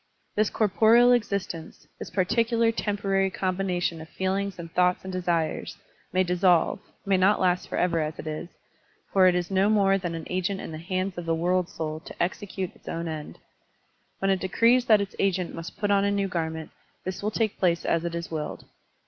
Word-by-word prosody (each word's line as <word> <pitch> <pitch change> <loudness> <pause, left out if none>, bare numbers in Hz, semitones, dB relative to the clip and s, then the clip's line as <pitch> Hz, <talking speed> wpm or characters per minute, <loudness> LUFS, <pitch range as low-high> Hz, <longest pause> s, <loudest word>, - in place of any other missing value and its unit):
This 215 0 +2
corporeal 225 +4 +5
existence, 200 -8 -2
this - - -6
particular 230 +4 +2
temporary 200 -3 0
combination 180 -3 -1
of 160 - -10
feelings 190 +1 -2
and 165 -1 -8
thoughts 180 0 +2
and 190 0 -6
desires, 175 -3 -1 0.3
may 185 +1 +3
dissolve, 180 -1 +3 0.3
may 195 -1 +3
not 190 +3 +4
last 180 -1 +1
forever 170 -2 +1
as 155 0 -2
it - - -8
is, 155 +2 -5 0.6
for 190 -1 +6
it 180 - +4
is 180 +1 -2
no 195 +2 +3
more 195 -2 +3
than 175 -3 -3
an 160 -1 -6
agent 185 +2 -1
in - - -6
the 155 - -6
hands 185 +2 -2
of 170 - -7
the 165 - +2
world 180 +2 +1
soul 155 -1 -4
to - - -11
execute 185 0 -4
its - - -23
own 170 0 -3
end. 155 -2 -6 0.8
When 195 0 +1
it 190 - +2
decrees 230 +6 +3
that 215 -3 +5
its 200 - -5
agent 185 -2 0
must 165 +3 -8
put 205 0 0
on 200 0 +4
a 200 - +2
new 200 -1 0
garment, 160 -3 -3 0.3
this 185 0 -4
will 210 - 0
take 215 -1 -1
place 170 -2 +1
as 165 0 +1
it 170 -1 -3
is 170 0 -5
willed. 155 -2 -4
185 Hz, 195 wpm, -26 LUFS, 170-200 Hz, 0.8 s, for